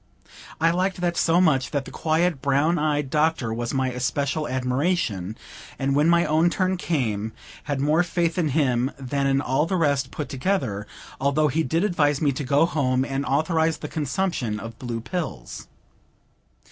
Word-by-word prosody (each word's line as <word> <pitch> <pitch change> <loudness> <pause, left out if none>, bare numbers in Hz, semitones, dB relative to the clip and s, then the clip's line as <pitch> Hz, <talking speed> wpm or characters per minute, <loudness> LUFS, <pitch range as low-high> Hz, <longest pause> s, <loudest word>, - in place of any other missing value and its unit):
I 165 +1 +4
liked 185 +1 -1
that 175 -1 0
so 165 +1 +3
much, 135 -8 +3
that 140 -2 -2
the - - -9
quiet, 160 -1 0
brown 145 +4 +2
eyed 150 -3 0
Doctor 150 -7 +1
was 120 +1 -3
my 130 -2 0
especial 140 +4 -1
admiration; 125 - -1 0.4
and 135 0 0
when 150 +3 +4
my 170 0 +4
own 160 +3 +3
turn 185 +1 0
came, 110 - -2 0.3
had 145 -2 -2
more 150 +4 +3
faith 170 -1 0
in 165 - +2
him 130 -4 +1
than 135 +1 -1
in 135 0 +2
all 140 +4 +1
the 190 - -1
rest 140 -5 +1
put 150 - -5
together, 130 - -2 0.3
although 140 +3 +2
he 160 +5 0
did 160 +5 0
advise 145 -8 +2
me 145 -3 +2
to 135 +2 -4
go 140 +4 +3
home, 130 -6 0
and 135 0 -3
authorize 160 +2 +1
the 150 - -6
consumption 150 - -2
of 115 +1 -9
blue 120 -2 -4
pills. 115 - -5
145 Hz, 170 wpm, -24 LUFS, 130-165 Hz, 0.4 s, I